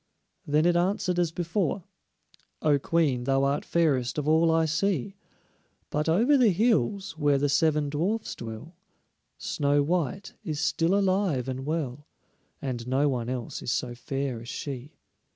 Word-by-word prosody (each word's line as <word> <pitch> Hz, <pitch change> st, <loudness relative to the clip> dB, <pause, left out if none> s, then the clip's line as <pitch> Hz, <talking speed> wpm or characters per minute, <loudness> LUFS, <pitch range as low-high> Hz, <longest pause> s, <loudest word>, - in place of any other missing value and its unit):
Then 150 Hz, +2 st, +3 dB
it 175 Hz, 0 st, +4 dB
answered 180 Hz, 0 st, +1 dB
as 170 Hz, -2 st, +1 dB
before: 175 Hz, +2 st, -1 dB, 0.8 s
"O 145 Hz, -2 st, +4 dB
Queen, 140 Hz, -6 st, +1 dB
thou 135 Hz, 0 st, +2 dB
art 140 Hz, +1 st, +1 dB
fairest 140 Hz, -8 st, +1 dB
of 150 Hz, -1 st, -2 dB
all 160 Hz, +2 st, +4 dB
I 160 Hz, 0 st, +3 dB
see, 190 Hz, +2 st, -1 dB, 0.8 s
But 150 Hz, +2 st, 0 dB
over 235 Hz, -, +4 dB
the 240 Hz, -4 st, +6 dB
hills, 200 Hz, -3 st, +1 dB
where 145 Hz, -2 st, +3 dB
the 145 Hz, +1 st, +1 dB
seven 150 Hz, +1 st, +2 dB
dwarfs 180 Hz, +10 st, -1 dB
dwell, 115 Hz, +9 st, -8 dB, 0.6 s
Snow 145 Hz, 0 st, +1 dB
white 170 Hz, +3 st, -2 dB
is 155 Hz, -2 st, -3 dB
still 165 Hz, +2 st, +1 dB
alive 190 Hz, -9 st, +1 dB
and 130 Hz, +1 st, -4 dB
well, 145 Hz, -3 st, -3 dB, 0.6 s
And 125 Hz, -3 st, -4 dB
no 135 Hz, +3 st, +2 dB
one 120 Hz, -3 st, -2 dB
else 125 Hz, -2 st, -4 dB
is -, -, -2 dB
so 125 Hz, -2 st, -1 dB
fair 135 Hz, -1 st, -3 dB
as 120 Hz, -, -9 dB
she." 140 Hz, 0 st, -6 dB
150 Hz, 150 wpm, -27 LUFS, 135-175 Hz, 0.8 s, the